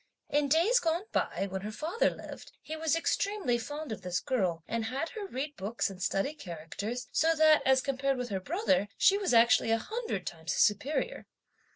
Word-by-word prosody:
In 290 Hz, 0 st, +2 dB
days 340 Hz, -, +4 dB
gone 335 Hz, 0 st, 0 dB
by, 195 Hz, -, 0 dB
when 190 Hz, 0 st, -4 dB
her 210 Hz, +2 st, -5 dB
father 325 Hz, -, 0 dB
lived, -, -, -10 dB
he 315 Hz, -, -5 dB
was 315 Hz, -1 st, +1 dB
extremely 350 Hz, -, 0 dB
fond 290 Hz, +3 st, -6 dB
of 220 Hz, -, -5 dB
this 180 Hz, -1 st, -1 dB
girl, 180 Hz, -10 st, -1 dB
and 230 Hz, -1 st, -2 dB
had 270 Hz, +8 st, -2 dB
her 420 Hz, -2 st, -6 dB
read 285 Hz, -1 st, -4 dB
books 200 Hz, +2 st, -2 dB
and 190 Hz, -1 st, -11 dB
study 195 Hz, +10 st, 0 dB
characters, 210 Hz, -, -6 dB
so 325 Hz, +1 st, +3 dB
that, 310 Hz, -1 st, +6 dB
as 265 Hz, 0 st, +5 dB
compared 275 Hz, 0 st, 0 dB
with 250 Hz, -1 st, -4 dB
her 195 Hz, -2 st, -2 dB
brother, 280 Hz, -, +1 dB
she 400 Hz, +1 st, +5 dB
was 390 Hz, -, 0 dB
actually 235 Hz, 0 st, +5 dB
a 225 Hz, -, +4 dB
hundred 435 Hz, -, -4 dB
times 165 Hz, -1 st, -4 dB
his -, -, +4 dB
superior. 280 Hz, -, 0 dB
260 Hz, 195 wpm, -30 LUFS, 210-320 Hz, -, that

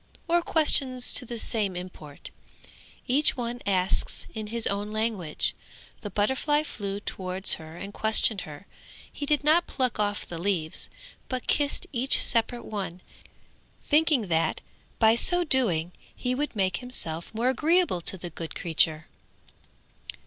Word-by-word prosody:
or 345 Hz, +1 st, +3 dB
questions 270 Hz, -6 st, +3 dB
to 250 Hz, -, +1 dB
the 235 Hz, -, -5 dB
same 210 Hz, -4 st, -1 dB
import. 175 Hz, -5 st, -9 dB, 0.7 s
Each 280 Hz, +3 st, +2 dB
one 245 Hz, 0 st, -4 dB
asks 185 Hz, -1 st, -1 dB
in 215 Hz, -1 st, -5 dB
his 230 Hz, +1 st, -2 dB
own 205 Hz, +1 st, -2 dB
language. 215 Hz, -8 st, -2 dB, 0.5 s
The 205 Hz, -, -5 dB
butterfly 265 Hz, +9 st, +1 dB
flew 200 Hz, -8 st, -5 dB
towards 190 Hz, -1 st, 0 dB
her 160 Hz, +1 st, -11 dB
and 200 Hz, +3 st, -8 dB
questioned 220 Hz, -2 st, +3 dB
her; 150 Hz, +5 st, -10 dB, 0.5 s
he 285 Hz, -, -6 dB
did 295 Hz, 0 st, +2 dB
not 320 Hz, +4 st, +4 dB
pluck 255 Hz, -5 st, -2 dB
off 205 Hz, -1 st, -1 dB
the 170 Hz, -, -7 dB
leaves, 170 Hz, -4 st, -1 dB, 0.4 s
but 255 Hz, -1 st, -3 dB
kissed 290 Hz, -1 st, +1 dB
each 260 Hz, +1 st, +2 dB
separate 235 Hz, +1 st, +2 dB
one, 190 Hz, -4 st, -5 dB, 0.8 s
thinking 300 Hz, -6 st, +3 dB
that 165 Hz, 0 st, +1 dB, 0.4 s
by 220 Hz, -1 st, +5 dB
so 355 Hz, +9 st, +4 dB
doing, 195 Hz, -, +2 dB, 0.2 s
he 250 Hz, 0 st, -2 dB
would 290 Hz, 0 st, -2 dB
make 185 Hz, -3 st, +1 dB
himself 170 Hz, -10 st, -2 dB
more 235 Hz, +3 st, +1 dB
agreeable 315 Hz, -, +2 dB
to 190 Hz, -, 0 dB
the 175 Hz, -1 st, -8 dB
good 165 Hz, 0 st, -7 dB
creature. 160 Hz, -1 st, +1 dB
220 Hz, 140 wpm, -27 LUFS, 185-260 Hz, 0.8 s, by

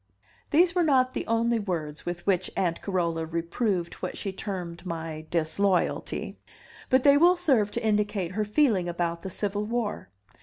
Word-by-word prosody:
These 340 Hz, +3 st, +4 dB
were 360 Hz, -, +2 dB
not 260 Hz, -5 st, +3 dB
the -, -, -4 dB
only 230 Hz, +1 st, +2 dB
words 165 Hz, -7 st, -4 dB
with 175 Hz, 0 st, -4 dB
which 185 Hz, -2 st, +1 dB
Aunt 170 Hz, -3 st, 0 dB
Carola 170 Hz, -4 st, -1 dB
reproved 170 Hz, +3 st, -1 dB
what 185 Hz, -, -4 dB
she 195 Hz, -2 st, -4 dB
termed 180 Hz, -4 st, -5 dB
my 160 Hz, -3 st, -5 dB
"disloyalty," 175 Hz, +3 st, 0 dB, 0.5 s
but 260 Hz, 0 st, +4 dB
they 285 Hz, -1 st, +7 dB
will 350 Hz, +4 st, +5 dB
serve 265 Hz, -, +2 dB
to 235 Hz, +2 st, -4 dB
indicate 210 Hz, -4 st, 0 dB
her 215 Hz, +3 st, -1 dB
feeling 210 Hz, -5 st, +2 dB
about 170 Hz, -1 st, -2 dB
the 190 Hz, -, -5 dB
Civil 205 Hz, +2 st, -2 dB
War. 230 Hz, -, -3 dB
195 Hz, 160 wpm, -27 LUFS, 170-235 Hz, 0.5 s, they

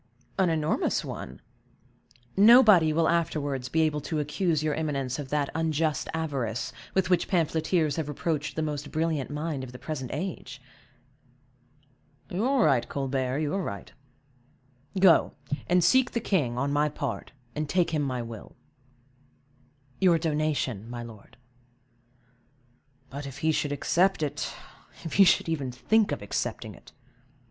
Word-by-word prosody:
"An 185 Hz, -2 st, +4 dB
enormous 155 Hz, -1 st, 0 dB
one. 65 Hz, -, -7 dB, 0.9 s
Nobody 210 Hz, -6 st, +7 dB
will 160 Hz, +1 st, +2 dB
afterwards 145 Hz, -6 st, -1 dB
be 160 Hz, +4 st, +2 dB
able 150 Hz, -1 st, 0 dB
to 155 Hz, +2 st, -3 dB
accuse 155 Hz, +1 st, 0 dB
your 155 Hz, -1 st, 0 dB
eminence 140 Hz, -4 st, -2 dB
of 140 Hz, -2 st, -6 dB
that 145 Hz, -1 st, 0 dB
unjust 160 Hz, -1 st, 0 dB
avarice 135 Hz, -8 st, -3 dB, 0.2 s
with 190 Hz, -1 st, +1 dB
which 180 Hz, -, +2 dB
pamphleteers 160 Hz, -2 st, +1 dB
have 160 Hz, -3 st, -2 dB
reproached 150 Hz, 0 st, -2 dB
the 160 Hz, -, -1 dB
most 145 Hz, -2 st, -4 dB
brilliant 155 Hz, -3 st, -1 dB
mind 150 Hz, -2 st, -3 dB
of 125 Hz, -, -8 dB
the -, -, -8 dB
present 130 Hz, -3 st, -5 dB
age." 145 Hz, -4 st, -5 dB, 1.7 s
"You 185 Hz, +5 st, -1 dB
are 265 Hz, -3 st, +3 dB
right, 120 Hz, -3 st, +2 dB
Colbert, 135 Hz, 0 st, -1 dB
you 150 Hz, -1 st, -1 dB
are 195 Hz, -, 0 dB
right; 100 Hz, -, -6 dB, 1.1 s
go, 185 Hz, -3 st, +5 dB, 0.4 s
and 180 Hz, 0 st, +4 dB
seek 255 Hz, +8 st, +4 dB
the 235 Hz, -, 0 dB
king, 150 Hz, -, 0 dB
on 140 Hz, +3 st, 0 dB
my 150 Hz, +1 st, +2 dB
part, 150 Hz, -, -5 dB, 0.2 s
and 150 Hz, -1 st, -3 dB
take 180 Hz, 0 st, +2 dB
him 155 Hz, -2 st, 0 dB
my 130 Hz, -4 st, -2 dB
will." 115 Hz, -2 st, -10 dB, 1.4 s
"Your 180 Hz, -3 st, +5 dB
donation, 150 Hz, -, -1 dB
my 120 Hz, 0 st, -6 dB
lord." 110 Hz, -3 st, -13 dB, 1.7 s
"But, 140 Hz, +1 st, -6 dB
if 135 Hz, 0 st, -9 dB
he 160 Hz, -, +4 dB
should 150 Hz, -1 st, -1 dB
accept 175 Hz, +4 st, +2 dB
it; 145 Hz, -, -3 dB, 0.5 s
if 165 Hz, -, -5 dB
he 200 Hz, -, +7 dB
should -, -, +4 dB
even 145 Hz, -6 st, -2 dB
think 200 Hz, -, +2 dB
of 145 Hz, -, -3 dB
accepting 100 Hz, -, -3 dB
it!" -, -, -16 dB
150 Hz, 145 wpm, -27 LUFS, 135-165 Hz, 1.7 s, Nobody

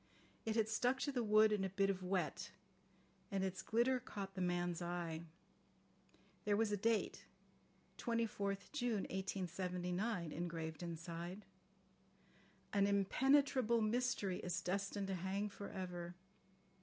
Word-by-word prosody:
It 220 Hz, -, +1 dB
had 220 Hz, -2 st, +3 dB
stuck 245 Hz, +4 st, +2 dB
to 285 Hz, -, +1 dB
the 250 Hz, -3 st, 0 dB
wood 215 Hz, 0 st, +6 dB
in 210 Hz, -2 st, +2 dB
a 190 Hz, -, 0 dB
bit 195 Hz, +1 st, +2 dB
of 190 Hz, -1 st, -4 dB
wet, 185 Hz, 0 st, -1 dB, 0.8 s
and 195 Hz, -2 st, 0 dB
its 190 Hz, -1 st, -2 dB
glitter 245 Hz, +3 st, +3 dB
caught 200 Hz, -5 st, -6 dB
the 185 Hz, -, -3 dB
man's 175 Hz, -1 st, 0 dB
eye. 170 Hz, -2 st, -2 dB, 1.2 s
There 205 Hz, -1 st, +2 dB
was 220 Hz, -1 st, +2 dB
a -, -, +3 dB
date, 225 Hz, +2 st, +1 dB, 0.7 s
24th 210 Hz, -4 st, -1 dB
June 245 Hz, -8 st, 0 dB
1879, 180 Hz, 0 st, -1 dB
engraved 165 Hz, -1 st, -3 dB
inside. 170 Hz, +3 st, -5 dB, 1.3 s
"An 200 Hz, -1 st, +4 dB
impenetrable 235 Hz, +4 st, +4 dB
mystery 215 Hz, -4 st, +1 dB
is 180 Hz, 0 st, -1 dB
destined 195 Hz, +3 st, -1 dB
to 195 Hz, -, -2 dB
hang 190 Hz, +3 st, -1 dB
for 200 Hz, 0 st, -7 dB
ever. 175 Hz, -2 st, -5 dB
195 Hz, 130 wpm, -40 LUFS, 180-220 Hz, 1.3 s, wood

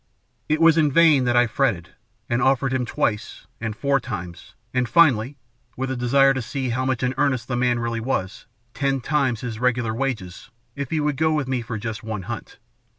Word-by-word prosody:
It 155 Hz, +1 st, +2 dB
was 165 Hz, -1 st, +5 dB
in 150 Hz, -2 st, +3 dB
vain 155 Hz, -4 st, +5 dB
that 120 Hz, 0 st, +1 dB
I 120 Hz, -, +5 dB
fretted, 110 Hz, -8 st, -1 dB, 0.4 s
and 120 Hz, +1 st, 0 dB
offered 135 Hz, 0 st, +2 dB
him 125 Hz, -2 st, -1 dB
twice, 105 Hz, -2 st, -2 dB
and 110 Hz, -2 st, -4 dB
four 140 Hz, +3 st, +1 dB
times, 90 Hz, -4 st, -8 dB, 0.2 s
and, 125 Hz, -2 st, 0 dB
finally 140 Hz, -6 st, +3 dB, 0.4 s
with 130 Hz, +1 st, -2 dB
a -, -, -2 dB
desire 135 Hz, +3 st, +4 dB
to 130 Hz, -, -2 dB
see 130 Hz, +2 st, -3 dB
how 130 Hz, +2 st, -1 dB
much 130 Hz, -2 st, -1 dB
in 125 Hz, 0 st, +1 dB
earnest 130 Hz, -5 st, +1 dB
the 125 Hz, -, -2 dB
man 120 Hz, 0 st, +1 dB
really 115 Hz, 0 st, -2 dB
was 110 Hz, -6 st, -3 dB, 0.3 s
ten 135 Hz, -1 st, 0 dB
times 135 Hz, -4 st, 0 dB
his 115 Hz, -3 st, -5 dB
regular 120 Hz, -2 st, 0 dB
wages 115 Hz, -6 st, -4 dB, 0.3 s
if 140 Hz, -2 st, -4 dB
he 160 Hz, -, 0 dB
would 150 Hz, -2 st, 0 dB
go 160 Hz, +1 st, +2 dB
with 150 Hz, -3 st, -1 dB
me 130 Hz, -2 st, -1 dB
for 115 Hz, -1 st, -5 dB
just 110 Hz, 0 st, -5 dB
one 110 Hz, -3 st, -5 dB
hunt. -, -, -7 dB
125 Hz, 205 wpm, -23 LUFS, 115-135 Hz, 0.4 s, was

